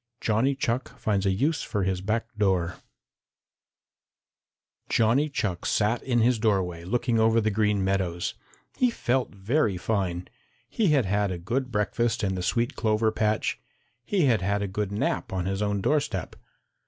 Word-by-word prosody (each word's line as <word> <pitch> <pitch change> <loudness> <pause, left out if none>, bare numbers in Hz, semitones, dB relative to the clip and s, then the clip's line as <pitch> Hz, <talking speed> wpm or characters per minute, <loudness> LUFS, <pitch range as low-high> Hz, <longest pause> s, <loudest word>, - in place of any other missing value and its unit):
IX - - -14
JOHNNY 115 +6 +2
CHUCK 125 -1 -2
FINDS 100 -2 0
A - - +4
USE 140 +11 +1
FOR 105 -3 -2
HIS 95 -1 -1
BACK 110 +4 -1
DOOR 95 -5 +1 2.1
Johnny 120 +7 +3
Chuck 100 -10 -2
sat 110 +3 +1
in 120 -3 +1
his 120 0 +3
doorway 95 -6 0
looking 120 +4 0
over 110 +1 +4
the 110 -1 +1
Green 105 -1 +1
Meadows. 95 -2 -1 0.4
He 250 - +3
felt 130 - 0
very 105 0 +1
fine. 90 -2 -2 0.4
He 220 - 0
had 145 -7 +3
had 100 +1 +1
a 90 - -3
good 125 +9 -2
breakfast 115 +2 0
in 95 -1 +1
the 90 - -3
sweet 120 +8 0
clover 110 0 +1
patch. 110 0 0 0.4
He 195 - 0
had 115 -7 +3
had 100 +2 0
a - - -1
good 100 +1 -3
nap 100 - -1
on 95 -2 -2
his 95 +1 -2
own 100 -1 0
doorstep. 145 - -1
105 Hz, 165 wpm, -26 LUFS, 95-120 Hz, 2.1 s, A